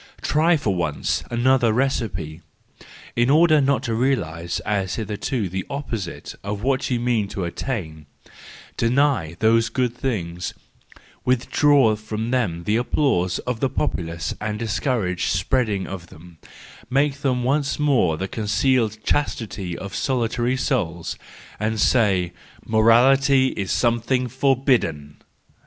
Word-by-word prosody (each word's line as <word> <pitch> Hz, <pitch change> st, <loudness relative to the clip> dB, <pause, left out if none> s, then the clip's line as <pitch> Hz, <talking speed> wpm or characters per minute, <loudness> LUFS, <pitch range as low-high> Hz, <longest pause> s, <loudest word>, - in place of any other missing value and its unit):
Try, 160 Hz, +3 st, +3 dB
just 155 Hz, -, 0 dB
for 100 Hz, -, +1 dB
once, 85 Hz, -4 st, -1 dB
another 120 Hz, 0 st, +3 dB
recipe, 100 Hz, -, -2 dB, 0.7 s
in 120 Hz, +1 st, +2 dB
order 155 Hz, +1 st, +5 dB
not 140 Hz, 0 st, +1 dB
to 115 Hz, -, -2 dB
realise 85 Hz, -10 st, -1 dB
as 95 Hz, -3 st, -1 dB
hitherto 110 Hz, +1 st, -2 dB
the 95 Hz, +1 st, -4 dB
opposite 115 Hz, -10 st, -5 dB
of 100 Hz, +1 st, -4 dB
what 135 Hz, +1 st, 0 dB
you 125 Hz, -2 st, 0 dB
mean 120 Hz, -4 st, 0 dB
to 100 Hz, -1 st, -4 dB
attain: 85 Hz, -, -5 dB, 0.7 s
deny 120 Hz, -, +1 dB
those 115 Hz, +2 st, +3 dB
good 125 Hz, -2 st, -1 dB
things, 90 Hz, -10 st, -3 dB, 0.7 s
withdraw 130 Hz, -1 st, +3 dB
from 110 Hz, +2 st, -4 dB
them 95 Hz, -10 st, 0 dB
the 105 Hz, +6 st, +1 dB
applause 120 Hz, -8 st, +1 dB
of 125 Hz, -2 st, -2 dB
the 135 Hz, -, +1 dB
populace 85 Hz, -, -2 dB
and 105 Hz, 0 st, -2 dB
discourage 105 Hz, -4 st, -1 dB
the -, -, +1 dB
spread 120 Hz, +5 st, +1 dB
of 95 Hz, -3 st, -4 dB
them, 85 Hz, 0 st, -15 dB, 0.5 s
make 140 Hz, +2 st, +1 dB
them 125 Hz, -3 st, 0 dB
once 140 Hz, +2 st, 0 dB
more 130 Hz, -, +2 dB
the 95 Hz, -, -3 dB
concealed 110 Hz, +2 st, +1 dB
chastities 105 Hz, -11 st, -2 dB
of 100 Hz, 0 st, -7 dB
solitary 120 Hz, -1 st, 0 dB
souls, 90 Hz, -, -1 dB, 0.6 s
say 100 Hz, -6 st, +2 dB, 0.3 s
that -, -, -23 dB
morality 130 Hz, +5 st, +4 dB
is 100 Hz, -6 st, -4 dB
something 120 Hz, +2 st, +1 dB
for¬ 130 Hz, +1 st, 0 dB
bidden 80 Hz, -, 0 dB
115 Hz, 130 wpm, -22 LUFS, 95-130 Hz, 0.7 s, order